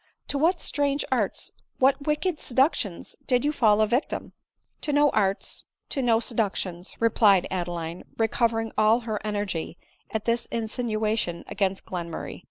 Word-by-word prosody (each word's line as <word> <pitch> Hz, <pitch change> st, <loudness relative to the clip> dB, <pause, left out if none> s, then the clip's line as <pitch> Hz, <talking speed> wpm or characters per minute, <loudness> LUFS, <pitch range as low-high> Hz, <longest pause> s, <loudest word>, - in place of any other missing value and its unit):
— -, -, -54 dB
to -, -, -1 dB
what 340 Hz, +4 st, +3 dB
strange 285 Hz, -2 st, 0 dB
arts, -, -, 0 dB, 0.3 s
what 275 Hz, +2 st, +3 dB
wicked 305 Hz, +2 st, 0 dB
seductions 250 Hz, -, 0 dB
did 250 Hz, +1 st, +2 dB
you 295 Hz, -, +3 dB
fall 220 Hz, -7 st, +4 dB
a -, -, +6 dB
victim? 240 Hz, +6 st, -1 dB, 0.2 s
" -, -, -42 dB
"To 300 Hz, -, -2 dB
no 290 Hz, 0 st, +4 dB
arts 195 Hz, -2 st, 0 dB
— -, -, -57 dB
to 275 Hz, -, 0 dB
no 230 Hz, -3 st, +4 dB
seductions" 200 Hz, -6 st, -2 dB
— -, -, -35 dB
replied 210 Hz, -5 st, +4 dB
Adeline, 175 Hz, -2 st, -3 dB
re 225 Hz, -, +3 dB
covering 225 Hz, -1 st, 0 dB
all 220 Hz, +3 st, +5 dB
her 220 Hz, -3 st, -3 dB
energy 205 Hz, -6 st, -3 dB, 0.3 s
at 220 Hz, -1 st, -3 dB
this 235 Hz, 0 st, 0 dB
insinuation 220 Hz, -5 st, -1 dB
against 195 Hz, -1 st, -1 dB
Glen 175 Hz, -2 st, -4 dB
murray. 165 Hz, -, -6 dB
225 Hz, 170 wpm, -26 LUFS, 195-255 Hz, 0.3 s, a